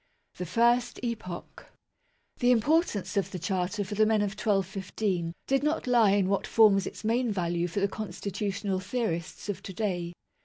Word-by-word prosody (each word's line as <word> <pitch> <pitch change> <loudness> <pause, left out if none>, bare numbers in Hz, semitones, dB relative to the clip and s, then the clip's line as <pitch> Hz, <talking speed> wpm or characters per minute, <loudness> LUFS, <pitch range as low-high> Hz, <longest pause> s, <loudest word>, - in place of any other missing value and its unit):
THE 180 - -4
FIRST 240 +4 +2
EPOCH. 215 -7 -6 0.7
The 245 - +3
importance 250 - +2
of 195 -2 +1
the 185 - -5
Charter 185 +3 -1
for 195 - -6
the 215 +1 +3
men 215 -1 +3
of 205 - -1
1215 195 -3 -1
did 270 0 +2
not 300 +2 0
lie 240 -4 +5
in 200 -2 +2
what 200 0 0
forms 205 -4 +5
its - - -8
main 235 +2 +1
value 175 -3 0
for 185 +3 -3
the 200 - +3
constitutional 200 0 -3
theorists 185 -5 -3
of 205 - -3
to 195 - -8
day. 175 -5 -2
200 Hz, 165 wpm, -28 LUFS, 185-225 Hz, 0.7 s, lie